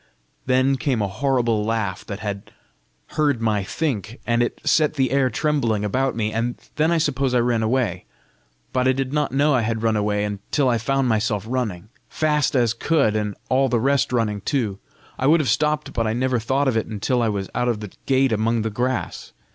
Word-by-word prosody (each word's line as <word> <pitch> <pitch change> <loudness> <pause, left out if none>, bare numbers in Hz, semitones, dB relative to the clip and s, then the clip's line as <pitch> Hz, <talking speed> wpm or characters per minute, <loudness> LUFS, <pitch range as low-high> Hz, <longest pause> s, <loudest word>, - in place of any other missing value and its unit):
Then 130 +1 +3
came 130 -4 0
a 100 - 0
horrible 120 0 0
laugh 105 -4 -2
that 100 -1 -6
had 100 -2 -5 0.6
heard 145 -5 +1
my 110 -3 0
think, 115 - -3
and 120 0 +1
it 120 - -1
set 155 -1 +2
the 130 -3 +1
air 135 -1 +3
trembling 120 -5 0
about 130 +5 0
me. 110 -1 -1
And 115 +2 -1 0.2
then 155 +2 +2
I 170 - +3
suppose 135 -5 0
I - - +4
ran 120 -1 +1
away, 110 -5 0 0.7
but 130 0 +2
I 130 - +4
did 135 +1 -3
not 150 -1 0
know 145 +3 +3
I 130 - +3
had 115 0 -2
run 110 -1 +2
away 105 0 0
until 105 +7 -1
I 120 -2 +1
found 135 +3 0
myself 110 -2 0
running, 110 -6 -3 0.2
fast 150 -2 +1
as 120 -3 +3
could, 140 -3 +1
and 105 -2 -1
all 130 +1 +2
the 120 -1 +1
rest 135 +2 +1
running 110 -4 0
too. 110 -6 -1 0.4
I 130 - +1
would 165 +3 +5
have 145 -6 0
stopped, 150 +5 0
but 115 -2 0
I 110 - 0
never 125 +1 0
thought 135 +5 0
of 130 - +1
it 110 - 0
until 115 +4 -1
I 115 - +2
was 100 -2 -2
out 125 0 0
of 115 -3 0
the 105 -3 -8 0.2
gate 135 -1 +3
among 110 +1 +1
the 110 - -2
grass. 125 +4 -3
120 Hz, 210 wpm, -22 LUFS, 110-135 Hz, 0.7 s, would